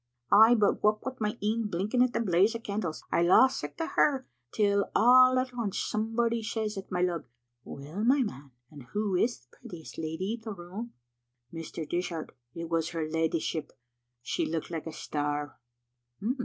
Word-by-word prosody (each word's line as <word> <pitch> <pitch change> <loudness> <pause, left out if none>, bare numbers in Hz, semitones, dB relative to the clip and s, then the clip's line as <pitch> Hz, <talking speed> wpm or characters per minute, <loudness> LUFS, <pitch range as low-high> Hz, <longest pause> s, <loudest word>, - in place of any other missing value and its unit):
Ay, 220 +4 +8
but 210 -3 +2
what 210 0 +2
wi' 260 -1 -3
my 215 +1 -1
een 220 +1 0
blinking 205 +7 0
at 250 -1 +4
the - - -1
blaze 200 +1 +3
o' - - -3
candles, 200 -7 -4
I - - +3
lost 220 +10 +5
sicht 145 0 -7
o' - - 0
her 270 -5 +2 0.3
till 200 -2 +2
all 255 +2 +7
at 255 0 -1
aince 230 -5 -3
somebody 230 +2 0
says 215 -1 -3
at 195 0 -8
my 180 -1 +1
lug, 175 -3 -1 0.2
* 120 0 -53
Well, 150 +9 -6
my 260 +3 +4
man, 140 - -7 0.2
and 145 -2 -11
who 205 -2 0
is 230 - +1
the 125 - -25
prettiest 165 -2 -10
lady 160 +6 -3
in 235 - -6
the 220 -1 -6
room?' 190 +7 -8 0.6
Mr. 165 -1 -6
Dishart, 175 -2 -3 0.2
it 170 0 -5
was 165 0 0
her 165 -2 -3
leddyship. 160 0 -1 0.5
She - - -1
looked 165 +1 -3
like 165 -1 -4
a - - -4
star." 145 -2 -3
200 Hz, 180 wpm, -29 LUFS, 165-230 Hz, 0.6 s, Ay